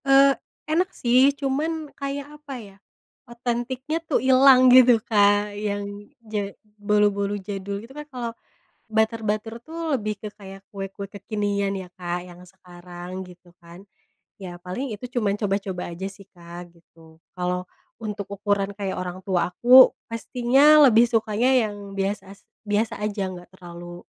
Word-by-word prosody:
Eee, 275 0 +6 0.3
enak 335 +4 +1
sih, 255 +3 +5
cuman 295 +3 -2
kayak, 285 +1 -6
apa 285 -2 -8
ya, 205 -5 -12 0.5
otentiknya 250 +6 -3
tuh 325 -3 0
ilang 260 0 +6
gitu, 250 -2 +8
Kak, 205 -1 +2
yang 205 0 -5 0.2
ja 210 -2 -3 0.3
bolu-bolu 205 -1 +1
jadul 200 0 -5
gitu 260 - -15
kan, 295 +1 -8
kalo 245 -3 -4 0.6
butter-butter 220 0 -1
tuh, 325 +4 -5
lebih 215 -5 -1
ke 210 0 -8
kayak 195 -1 -12
kue-kue 195 0 -6
kekinian 200 -1 -2
ya, 185 -2 -8
Kak, 175 0 -3
yang 175 -1 -13
sekarang, 180 0 -10
gitu 180 -1 -17
kan. 170 +2 -14 0.5
Ya, 175 -3 -9
paling 205 +8 -5
itu 215 +4 -7
cuman 215 -4 +2
coba-coba 195 -3 -2
aja 175 +3 -6
sih, 195 0 -16
Kak, 175 0 -12
gitu. 165 -1 -20 0.2
Kalo 180 0 -2 0.3
untuk 210 -3 -5
ukuran 200 0 -1
kayak 195 -2 -3
orang 180 0 -5
tua 180 -3 +1
aku, 250 +7 +8 0.2
pastinya 270 +6 +5
lebih 235 -1 +5
sukanya 225 +2 +1 0.2
yang 205 -1 -9
bias 195 +1 -1
as 195 +1 -14 0.3
biasa 210 +1 0
aja, 205 -2 -2
enggak 175 -1 -11
terlalu 175 -1 -10
205 Hz, 145 wpm, -24 LUFS, 190-245 Hz, 0.6 s, gitu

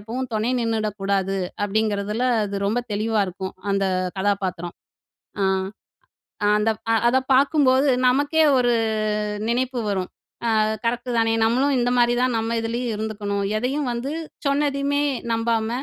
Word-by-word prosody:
எப்பவும் 240 +4 -5
துணை 215 +3 0
நின்னுடக்கூடாது." 200 -4 -1 0.3
அப்படிங்கிறதில 210 +2 0 0.2
அது 200 -1 -4
ரொம்ப 230 +4 +1
தெளிவா 215 +1 0
இருக்கும். 190 +1 -6 0.2
அந்த 195 0 +1 0.3
கதாபாத்திரம். 190 -3 -2 0.7
அ - - +2 1.1
அந்த 210 +1 +2 0.2
அ - - +4
அத 260 +2 +3 0.2
பார்க்கும்போது 275 0 +4 0.2
நமக்கே 285 +5 +3 0.2
ஒரு 245 -1 +3 0.8
நினைப்பு 250 +1 0
வரும், 190 -3 -1 0.5
அ - - +4 0.2
"கரெக்டுதானே 230 -1 0
நம்மளும் 260 +5 +2
இந்த 245 0 +1
மாரி 240 0 +4
தான் 255 -1 +1
நம்ம 225 +1 -1
இதுலேயும் 235 +1 -2
இருந்துக்கணும். 205 -2 -3 0.2
எதையும் 265 +4 -1
வந்து 250 +5 -3 0.3
சொன்னதையுமே 280 0 +1 0.3
நம்பாம, 225 -1 0
230 Hz, 120 wpm, -23 LUFS, 205-255 Hz, 1.1 s, அ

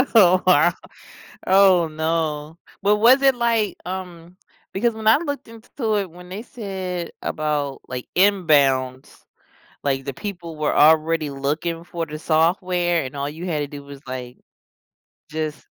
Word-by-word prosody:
Oh, 185 -3 +6
wow. 175 -1 +5 0.7
Oh, 190 -3 +5
no. 160 0 -2 0.2
But, 205 +2 +3
was 245 +6 +6
it, 270 -2 +4
like, 230 -3 0
um, 180 -1 -7 0.4
because 230 +4 +1
when 220 0 -5
I 225 - +7
looked 285 -4 -5
int 230 0 -15
to 220 -5 0
it, 195 -4 -2
when 180 +1 -13
they 195 +3 -6
said 190 -8 -5
about, 150 -3 -2
like, 125 -1 -6
inbounds, 140 -9 +2 0.7
like, 135 -1 -1
the 140 - -5
people 175 -3 -7
were 150 -1 -1
already 155 0 +4
looking 155 +5 -3
for 170 -2 -4
the 155 0 -7
software 175 +1 +1
and 130 +2 -7
all 140 0 -2
you 160 +5 -7
had 155 -4 -1
to 145 - -2
do 145 0 -9
was, 140 -1 -11
like, 125 -1 -7 0.9
just 155 -1 -4
170 Hz, 150 wpm, -22 LUFS, 150-195 Hz, 0.9 s, I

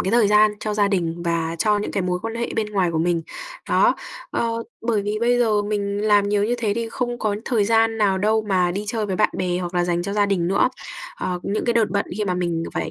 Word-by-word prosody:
cái 190 - -1
thời 230 -2 +4
gian 210 +1 +5
cho 215 -1 -2
gia 205 -1 +2
đình 170 -3 -1
và 165 -1 -1
cho 210 +2 +2
những 205 - -3
cái 195 - -1
mối 180 0 -1
quan 225 0 -4
hệ 235 0 -2
bên 220 -1 0
ngoài 190 -4 +1
của 165 - -1
mình. 170 0 +1 0.5
Đó, - - +4 0.4
ờ, 230 0 -1 0.2
bởi 225 -3 0
vì 210 +1 -2
bây 245 +1 +3
giờ 215 -4 +2
mình 205 -1 -2
làm 205 -1 +3
nhiều 205 0 +2
như 235 +3 0
thế 215 -3 0
thì 230 0 -2
không 240 +1 -3
có 215 -2 -1
thời 225 -5 +1
gian 225 +1 +2
nào 195 -3 +2
đâu 215 +3 +2
mà 180 -2 +2
đi 200 +4 -3
chơi 220 -1 -1
với 190 -2 -2
bạn 210 - +3
bè 180 -1 0
hoặc 180 0 -5
là 175 0 +2
dành 175 0 0
cho 200 +2 -4
gia 205 0 +2
đình 180 -4 0
nữa. 195 +6 +3 0.5
Ờ, 180 -1 -3
những 205 +2 -2
cái 240 - +2
đợt 230 -2 +2
bận 200 -1 0
khi 210 - 0
mà 185 -2 -1
mình 170 -2 -1
phải, - - -2
205 Hz, 265 wpm, -22 LUFS, 180-220 Hz, 0.5 s, gian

